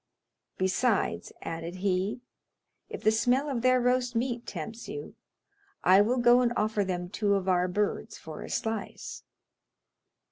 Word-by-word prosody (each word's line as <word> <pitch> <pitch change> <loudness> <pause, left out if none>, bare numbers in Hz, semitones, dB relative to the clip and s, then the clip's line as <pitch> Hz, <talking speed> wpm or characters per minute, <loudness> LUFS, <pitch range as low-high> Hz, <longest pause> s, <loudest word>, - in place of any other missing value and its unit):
"Besides," 195 +4 +1
added 165 +1 -5
he, 190 +4 -1 0.7
"if - - -7
the 215 - +5
smell 250 +6 +2
of 255 -4 -1
their 255 +1 +4
roast 250 0 +1
meat 240 0 -1
tempts 220 +7 -6
you, 435 +1 -6 0.7
I 190 +2 +7
will 240 +5 +2
go 240 0 +6
and 240 -1 +2
offer 210 -1 +1
them 180 -2 -3
two 200 +2 +1
of 195 -1 -2
our 180 -1 +3
birds 205 +4 -2
for 155 -1 -9
a - - -7
slice." 225 -1 -4
215 Hz, 145 wpm, -29 LUFS, 185-245 Hz, 0.7 s, I